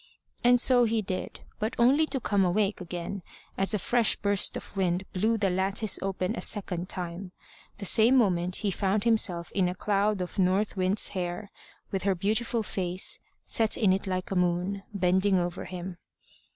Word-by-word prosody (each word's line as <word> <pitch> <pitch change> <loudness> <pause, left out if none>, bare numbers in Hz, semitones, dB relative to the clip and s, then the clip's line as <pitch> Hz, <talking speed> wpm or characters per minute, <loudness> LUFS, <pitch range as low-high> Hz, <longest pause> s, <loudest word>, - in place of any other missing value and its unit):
And 245 0 +5
so 245 0 +5
he 225 -1 0
did, 185 -1 -5 0.2
but 220 +2 -2
only 275 +7 +4
to 270 - -2
come 200 -4 +1
awake 195 +2 0
again, 180 +2 -5 0.3
as 195 +2 0
a - - +2
fresh 235 +3 +2
burst 200 -1 0
of - - -11
wind 185 -1 0
blew 220 +5 +1
the 200 -3 +1
lattice 195 +3 -1
open 190 +2 -2
a - - -5
second 185 -4 -1
time. 180 +1 -6 0.4
The 200 - -6
same 230 +7 +6
moment 180 -5 +1
he 200 - +2
found 200 +2 0
himself 200 -7 +1
in 185 -3 +1
a 180 - -4
cloud 205 +1 0
of 180 +2 -5
North 190 +3 +1
Wind's 190 +2 0
hair, 180 +2 -4 0.4
with 195 - -2
her 195 -1 +1
beautiful 220 +5 0
face, 185 -2 -2 0.3
set 220 -1 +2
in 195 -4 +3
it 195 +1 -3
like 185 0 -3
a - - -1
moon, 180 +2 0
bending 190 0 +2
over 175 0 -3
him. 180 0 -7
195 Hz, 180 wpm, -28 LUFS, 180-215 Hz, 0.4 s, same